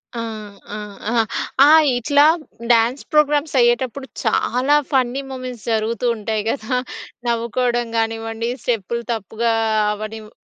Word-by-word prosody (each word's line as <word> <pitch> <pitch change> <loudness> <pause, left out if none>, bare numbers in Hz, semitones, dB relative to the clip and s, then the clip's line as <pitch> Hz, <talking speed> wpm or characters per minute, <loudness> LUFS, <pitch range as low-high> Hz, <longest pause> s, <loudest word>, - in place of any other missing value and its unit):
ఆ! - - -3 0.6
ఆ! - - -4 0.3
అహా! 230 +1 +3 0.4
ఆ 295 - +7 0.3
ఇట్లా 285 +4 +4 0.5
డ్యాన్స్ 235 +3 +3
ప్రోగ్రామ్స్ 300 0 +2
అయ్యేటప్పుడు 250 +3 +1 0.2
చాలా 260 +4 +2 0.2
ఫన్నీ 260 0 +1
మూమెంట్స్ 255 -4 -7
జరుగుతూ 225 +2 -1
ఉంటాయి 215 -1 -2
గదా! 250 0 -1 0.5
నవ్వుకోవడం 235 +1 0
గానివ్వండి 225 0 -2
స్టెప్పులు 235 0 -2
తప్పుగా 225 +2 -2 0.4
అవ్వనివ్ 215 +1 -6
235 Hz, 110 wpm, -20 LUFS, 225-255 Hz, 0.6 s, ఆ